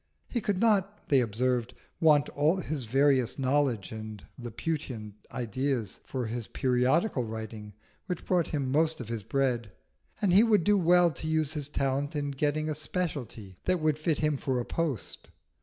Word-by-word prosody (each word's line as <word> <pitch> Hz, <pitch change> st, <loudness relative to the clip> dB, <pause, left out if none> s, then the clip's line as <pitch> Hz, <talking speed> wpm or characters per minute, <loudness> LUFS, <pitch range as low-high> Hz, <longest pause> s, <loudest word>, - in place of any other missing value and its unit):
He 240 Hz, -, -2 dB
could 205 Hz, -4 st, 0 dB
not, 205 Hz, -2 st, +1 dB
they 140 Hz, -, +5 dB
observed, 125 Hz, +1 st, 0 dB, 0.2 s
want 150 Hz, -3 st, +5 dB
all 150 Hz, +4 st, +2 dB
his 155 Hz, -8 st, -3 dB
various 130 Hz, 0 st, +3 dB
knowledge 135 Hz, -6 st, +1 dB
and 110 Hz, -2 st, -7 dB
Laputan 120 Hz, -3 st, -4 dB, 0.2 s
ideas 125 Hz, -2 st, -2 dB
for 130 Hz, -2 st, -3 dB
his 115 Hz, 0 st, -4 dB
periodical 130 Hz, -, +1 dB
writing 110 Hz, -2 st, -6 dB, 0.3 s
which 180 Hz, -3 st, -4 dB
brought 180 Hz, -3 st, +2 dB
him 140 Hz, -4 st, -2 dB
most 160 Hz, +2 st, +2 dB
of 120 Hz, -3 st, -7 dB
his 115 Hz, -2 st, -3 dB
bread, 120 Hz, -2 st, 0 dB, 0.5 s
and 195 Hz, -4 st, +2 dB
he 195 Hz, -, +8 dB
would 220 Hz, -6 st, +4 dB
do 210 Hz, +3 st, +4 dB
well 175 Hz, -2 st, +5 dB
to 155 Hz, -, -6 dB
use 155 Hz, -1 st, +1 dB
his 145 Hz, -2 st, -3 dB
talents 140 Hz, +1 st, -1 dB
in 145 Hz, -1 st, -1 dB
getting 150 Hz, +2 st, 0 dB
a 155 Hz, -, 0 dB
speciality 145 Hz, -, -4 dB
that 185 Hz, -1 st, +2 dB
would 155 Hz, -1 st, +1 dB
fit 155 Hz, -1 st, +1 dB
him 150 Hz, -2 st, +1 dB
for 130 Hz, -2 st, -1 dB
a 120 Hz, -, -3 dB
post. 155 Hz, -, -3 dB
140 Hz, 170 wpm, -29 LUFS, 120-160 Hz, 0.5 s, he